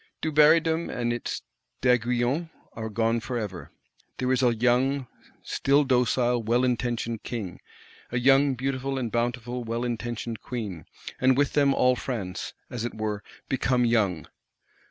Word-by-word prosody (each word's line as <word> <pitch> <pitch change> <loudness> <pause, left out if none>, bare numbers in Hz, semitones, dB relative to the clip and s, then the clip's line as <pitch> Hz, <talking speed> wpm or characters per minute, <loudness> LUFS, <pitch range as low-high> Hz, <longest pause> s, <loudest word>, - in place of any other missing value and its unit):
Dubarrydom 160 +2 +4
and 120 -1 -1
its 120 - -4 0.4
D'Aiguillons 125 +5 +1 0.2
are 110 0 -5
gone 115 +2 +1
forever. 110 -7 -5 0.5
There 130 0 0
is 130 - +2
a 120 -2 +3
young, 125 +4 +2 0.4
still 140 +2 +2
docile, 125 -2 +2
well 120 +3 +2
intentioned 120 -2 -1
King; 105 -8 -5 0.5
a 120 - -1
young, 135 +2 +4
beautiful 135 +1 -2
and 120 -4 -2
bountiful, 120 +1 -2
well 115 +1 -2
intentioned 120 -1 -4
Queen; 105 -9 -5 0.3
and 130 0 +4
with 145 0 +2
them 140 -2 +4
all 125 0 +4
France, 100 -8 -4
as 120 -2 -5
it 120 - -4
were, 105 -1 -2 0.3
become 125 -2 +1
young. 105 -8 +1
120 Hz, 135 wpm, -26 LUFS, 115-130 Hz, 0.5 s, Dubarrydom